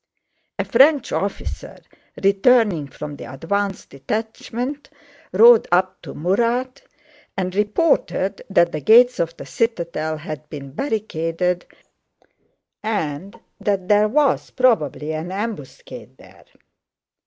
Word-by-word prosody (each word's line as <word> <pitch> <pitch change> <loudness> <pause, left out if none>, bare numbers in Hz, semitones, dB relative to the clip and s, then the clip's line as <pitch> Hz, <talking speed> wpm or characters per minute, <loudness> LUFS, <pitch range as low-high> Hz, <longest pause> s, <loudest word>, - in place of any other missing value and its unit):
A - - -1
French 275 +2 +4
officer, 200 0 -4 0.5
returning 200 - +3
from 145 +1 -8
the - - -9
advanced 195 +8 -3
detachment, 225 - -5 0.4
rode 225 +4 +7
up 185 +1 +1
to - - -9
Murat 235 - 0 0.6
and 185 -1 -2
reported 205 - 0
that 170 -3 +3
the 155 - -4
gates 245 - +6
of 165 0 -2
the - - -9
citadel 170 -8 -2
had 155 0 -8
been 140 -2 -8
barricaded 180 - -2 1.1
and 195 -4 -3 0.2
that 195 -3 -1
there 210 0 +5
was 280 +4 +1
probably 155 - +1
an 160 +3 -5
ambuscade 200 - -7
there. - - -18
195 Hz, 110 wpm, -21 LUFS, 165-230 Hz, 1.1 s, rode